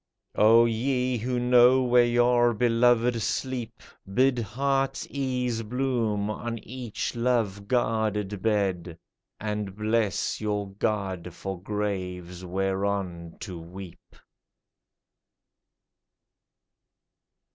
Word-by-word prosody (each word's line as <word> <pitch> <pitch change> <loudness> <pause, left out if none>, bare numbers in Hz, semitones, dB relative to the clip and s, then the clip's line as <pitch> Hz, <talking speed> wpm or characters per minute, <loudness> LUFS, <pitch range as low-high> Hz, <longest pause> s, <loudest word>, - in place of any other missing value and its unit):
O, 115 +2 +6
ye 125 +2 0
who 125 +3 -2
know 125 +1 +5
where 125 -1 +5
your 120 0 +3
beloved 120 0 +3
sleep, 120 0 -3 0.3
Bid 130 +3 +3
heart's 135 +4 -1
ease 125 -4 -1
bloom 115 -3 -1
on 115 +2 -4
each 125 -3 -5
love 115 -5 0
guarded 110 -4 0
bed, 95 -6 0 0.4
And 105 -2 -3
bless 110 -1 0
your 105 -2 -2
God 95 -3 -2
for 95 -2 -6
graves 95 -3 -4
whereon 95 -2 -2
to 90 -3 -6
weep 90 +1 -11
110 Hz, 90 wpm, -26 LUFS, 100-125 Hz, 0.4 s, O